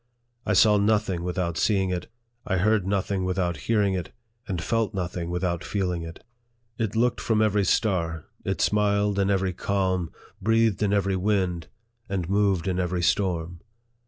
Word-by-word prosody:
I 105 - +2
saw 105 +2 +6
nothing 105 -3 +1
without 85 -2 -2
seeing 95 -3 +2
it, 90 -1 -3 0.4
I 95 - +1
heard 105 0 +2
nothing 100 -1 0
without 90 -2 0
hearing 105 +4 +1
it, 90 -2 -4 0.4
and 90 -4 -2
felt 110 +4 -1
nothing 90 -2 -3
without 90 -1 -1
feeling 90 -4 -2
it. 80 0 -9 0.6
It 110 -2 -1
looked 120 +2 +1
from 110 -2 +1
every 105 -2 +2
star, 85 -6 0 0.2
it - - -2
smiled 105 -1 +2
in 100 0 +2
every 95 -2 +1
calm, 95 -2 -1 0.3
breathed 115 0 +2
in 105 -2 +2
every 100 -2 +1
wind, 90 -4 0 0.4
and 95 -4 -2
moved 100 -2 +1
in 90 -1 0
every 90 -1 -1
storm. 85 -3 0
95 Hz, 160 wpm, -25 LUFS, 90-105 Hz, 0.6 s, saw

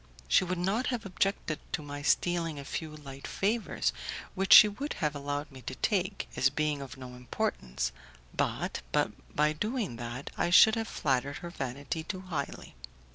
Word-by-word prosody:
She - - +5
would 185 0 -2
not 195 +8 0
have 245 -4 -2
objected 195 -4 -1
to 155 - -1
my 145 0 -6
stealing 165 +1 +1
a 140 - -7
few 155 +1 -4
light 140 -2 -9
favours 215 +3 0 0.4
which 195 0 -1
she 215 - +12
would 275 +9 -4
have 150 -1 -1
allowed 145 +1 -3
me 130 -1 -11
to 130 +2 -5
take, 195 +3 0
as 135 - +4
being 150 -1 -1
of 135 -1 -8
no 130 -1 -9
importance, 65 - -2 0.4
but, - - -1
by 150 - +1
doing 210 - -2
that, 120 +3 -6
I - - +1
should 220 +5 +8
have 225 -1 -1
flattered 140 -1 0
her 170 - -6
vanity 140 +2 -4
too 185 +3 -5
highly. 180 -4 -5
155 Hz, 170 wpm, -30 LUFS, 135-190 Hz, 0.4 s, she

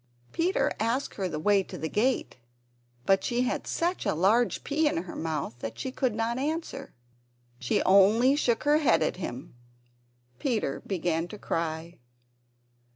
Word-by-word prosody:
Peter 355 +4 +1
asked 235 +5 -1
her 190 -3 -1
the 155 - -4
way 200 +5 +3
to 185 -1 -8
the 160 0 -3
gate, 235 - 0 0.7
but 195 0 +3
she 240 0 0
had 255 - -2
such 350 +2 -1
a - - 0
large 215 +8 +2
pea 305 +2 +1
in - - 0
her 185 - -9
mouth 155 -6 -3
that 110 - -6
she 260 - -4
could 255 -4 -1
not 230 +2 -1
answer. 295 -1 -3 0.7
She 125 - 0
only 210 +8 +5
shook 240 -6 +1
her 295 +1 +4
head 300 - +3
at - - -1
him. 135 -8 -6 0.9
Peter 220 - -1
began 170 -3 -1
to 210 - -9
cry. 165 -1 -3
215 Hz, 155 wpm, -28 LUFS, 170-265 Hz, 0.9 s, only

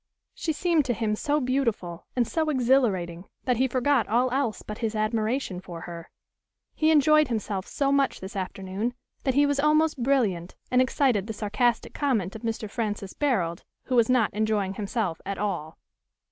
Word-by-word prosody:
She 325 - -2
seemed 330 0 +2
to 245 -3 0
him 215 -2 0
so 295 +6 0
beautiful, 240 - -1
and 245 -3 +2
so 320 -1 0
exhilarating, 230 - +1 0.2
that 250 -2 +2
he 260 +2 +3
forgot 255 -1 +2
all 245 +3 +2
else 260 -4 -1
but 210 +1 -7
his 225 -2 -2
admiration 215 -1 -1
for 170 -3 -8
her. 170 -1 -8 0.6
He 315 - +2
enjoyed 305 0 +5
himself 210 -5 -3
so 275 -1 0
much 280 -1 +2
this 190 +2 -8
afternoon, 195 +4 -3 0.3
that 265 -2 +1
he 290 +1 +5
was 285 -1 +1
almost 305 -1 +3
brilliant, 215 -10 +1 0.2
and 250 0 +5
excited 255 -6 +2
the 220 - -3
sarcastic 215 +3 0
comment 220 - 0
of 220 - -7
Mr. 225 -1 -3
Francis 205 -3 -3
Barold, 190 - 0 0.2
who 255 - -2
was 235 -1 +4
not 250 -4 +3
enjoying 210 -2 0
himself 200 -3 -2
at 200 0 -4
all. 175 -7 -3
230 Hz, 175 wpm, -26 LUFS, 200-270 Hz, 0.6 s, enjoyed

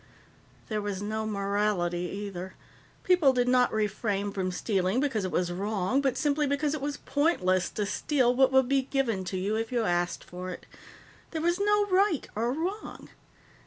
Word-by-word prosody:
"There 215 -1 -2
was 205 -2 -3
no 215 +2 -3
morality, 200 -4 0 0.2
either. 185 -1 -7 0.5
People 355 -7 +4
did 245 -1 +1
not 250 0 +4
refrain 205 -1 -1
from 190 -2 -2
stealing 190 +3 0
because 260 -8 0
it 185 - -3
was 175 -1 0
wrong, 200 +6 0
but 265 -3 0
simply 295 +1 +1
because 285 +1 0
it 310 - -3
was 285 0 -3
pointless 255 - +1
to 210 - -2
steal 250 +3 +1
what 265 +1 +4
would 265 -1 +4
be 275 0 +3
given 255 -7 -1
to 185 - -3
you 200 +4 -1
if 225 +1 -2
you 240 -2 +1
asked 175 -3 0
for 180 +1 -7
it. 180 - -8 0.6
There 320 - -4
was 345 +2 +1
no 415 0 +3
right 380 -4 +2
or 230 +3 0
wrong. 360 +9 -4
225 Hz, 175 wpm, -28 LUFS, 195-280 Hz, 0.6 s, People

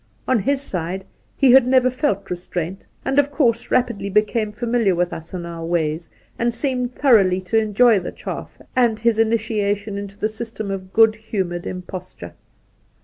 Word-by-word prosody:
On 255 -3 +3
his 275 +6 0
side, 185 -3 -3 0.3
he 270 -3 +5
had 260 -1 +7
never 255 0 +4
felt 205 -8 -1
restraint, 180 +1 -5 0.2
and 270 +1 +2
of 285 0 +3
course 245 -5 +1
rapidly 235 -6 0
became 210 +2 +1
familiar 230 -3 +1
with 175 0 0
us 160 0 -8
and 180 -2 -5
our 170 -1 -7
ways, 165 -1 -1 0.3
and 235 0 +2
seemed 250 -1 -2
thoroughly 200 -9 +4
to 185 +5 +1
enjoy 220 +1 +4
the 180 - -6
chaff - - -7 0.2
and 240 -3 +3
his 225 0 +1
initiation 210 -2 0
into 200 0 -8
the 215 - 0
system 220 -2 -6
of 185 -1 -6
good 225 0 +5
humoured 190 -6 -4
imposture. 180 - -8
215 Hz, 165 wpm, -21 LUFS, 185-240 Hz, 0.3 s, had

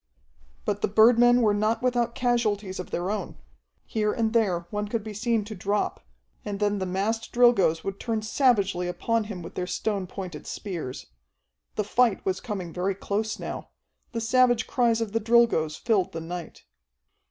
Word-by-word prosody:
But - - -1
the - - +2
birdmen 240 +3 +5
were 210 -2 +4
not 215 +3 0
without 240 -2 +1
casualties 215 -6 0
of 180 - -6
their 180 +3 -2
own. 215 - -4 0.5
Here 210 -2 0
and 225 0 0
there 200 -7 +2
one 210 0 -2
could 220 0 -2
be 215 -1 -6
seen 225 0 0
to 215 - -7
drop, 200 +1 -2 0.4
and 205 -2 -4
then 205 -1 +1
the 190 - -2
massed 205 +5 -1
Drilgoes 235 -10 +4
would 195 0 -4
turn 225 -2 -2
savagely 205 -7 +2
upon 220 +5 0
him 195 -5 -7
with 165 - -9
their 180 - -3
stone 195 +1 -2
pointed 180 -5 -7
spears. 155 -10 -5 0.7
The 210 - 0
fight 230 +1 +2
was 190 0 -1
coming 190 -8 -5
very 185 +2 -1
close 210 +2 -2
now. - - -6 0.4
The 230 - -2
savage 245 0 +3
cries 235 -2 +2
of 225 -3 -2
the 225 +1 0
Drilgoes 225 -9 +3
filled 195 -5 +1
the 165 - -3
night. 170 0 -7
210 Hz, 175 wpm, -26 LUFS, 190-230 Hz, 0.7 s, birdmen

